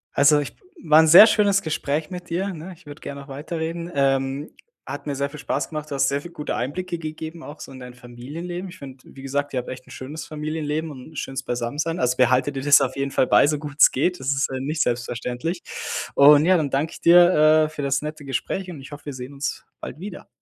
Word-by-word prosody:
Also 145 +1 +5
ich 145 - -5 0.3
war 155 0 +6
'n 160 - +5
sehr 175 +7 +11
schönes 200 -3 +3
Gespräch 155 0 -2
mit 180 -1 -8
dir, 190 +4 -2
ne? 170 +3 -8
Ich 180 - -23
würde 145 0 -11
gerne 140 0 -7
noch 140 - -13
weiterreden. 165 +4 -5
Ähm, 135 +1 0 0.3
hat - - -7
mir 145 - -2
sehr 140 +1 -1
viel 150 +1 -10
Spaß 140 0 -2
gemacht. 155 -1 -6
Du 140 - -4
hast 135 -1 +2
sehr 140 +1 -1
viel 175 - -10
gute 155 -3 -4
Einblicke 170 +7 -3
gegeben 160 +1 -7
auch 150 0 -10
so - - -9
in 130 - -10
dein 125 -1 -10
Familienleben. 145 +10 -7
Ich 180 - -12
finde, 135 -2 -11
wie 135 - -13
gesagt, 140 +1 -2
ihr 130 - 0
habt 125 - -7
echt 130 0 -8
'n - - -17
schönes 150 +5 -7
Familienleben 155 0 -3
und 135 +3 -11
'n - - -17
schönes 135 -1 -4
beisammen 120 +2 -4
sein. 165 +3 -1
Also 125 0 +1
behalte 130 +2 +3
dir 135 -1 -5
das 140 0 +6
auf 130 -1 -1
jeden 140 0 -2
Fall - - +2
bei, 105 +7 +5
so 150 0 +1
gut 145 -1 -8
es - - +9
geht. 180 +7 0
Das 130 - -7
ist, 140 0 +1
äh, 130 - -3
nicht 150 +4 -2
selbstverständlich. 125 +7 -3 0.5
Und 145 +2 +7
ja, 185 +1 +5
dann 150 -4 -1
danke 145 +5 -1
ich - - -11
dir, 165 -3 +6
äh, - - -4
für 155 -1 -7
das 140 -1 0
nette 150 0 -6
Gespräch 160 +8 -3
und 160 -6 -8
ich 135 - -12
hoffe, 145 0 -10
wir 145 - -5
sehen 130 +2 -8
uns 140 0 -4 0.2
bald 155 - -8
wieder. 195 0 -8
145 Hz, 250 wpm, -23 LUFS, 135-160 Hz, 0.5 s, sehr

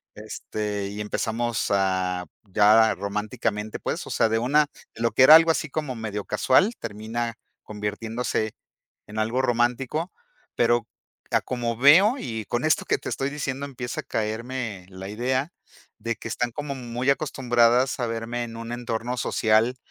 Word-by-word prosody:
este, 105 -2 -4
y 105 +1 -7
empezamos 115 +2 -1
a 95 -2 +1 0.2
ya 105 +2 +5
románticamente, 105 +1 -3
pues, - - -3
o - - -7
sea, 115 - +3
de 110 - +1
una 145 +6 +3 0.3
de 115 - -9
lo 115 0 +2
que 130 - +5
era 155 +4 +11
algo 165 0 +7
así 160 -1 -2
como 140 -3 -3
medio 105 -3 -4
casual, 195 - +3
termina 115 +2 -4 0.3
convirtiéndose 110 +1 -3 0.5
en 105 +1 -5
algo 115 +4 +1
romántico, 125 +6 0 0.4
pero 120 -1 +2 0.5
a - - +3
como 120 -2 -3
veo 165 - +7
y 110 - -4
con 120 +6 -1
esto 155 - +2
que - - +1
te - - -9
estoy 135 +1 -2
diciendo, 140 -1 -3
empieza 125 -3 -5
a - - -26
caerme 110 -2 -3
la 95 0 -8
idea, 130 - -1 0.5
de 115 0 -2
que - - -7
están 120 +1 -1
como 145 +3 -4
muy 125 0 -2
acostumbradas 125 -2 +2
a 120 - 0
verme 115 +1 -3
en 115 -1 -9
un 115 0 -6
entorno 120 0 -3
social 110 +3 +2
115 Hz, 160 wpm, -25 LUFS, 110-130 Hz, 0.5 s, era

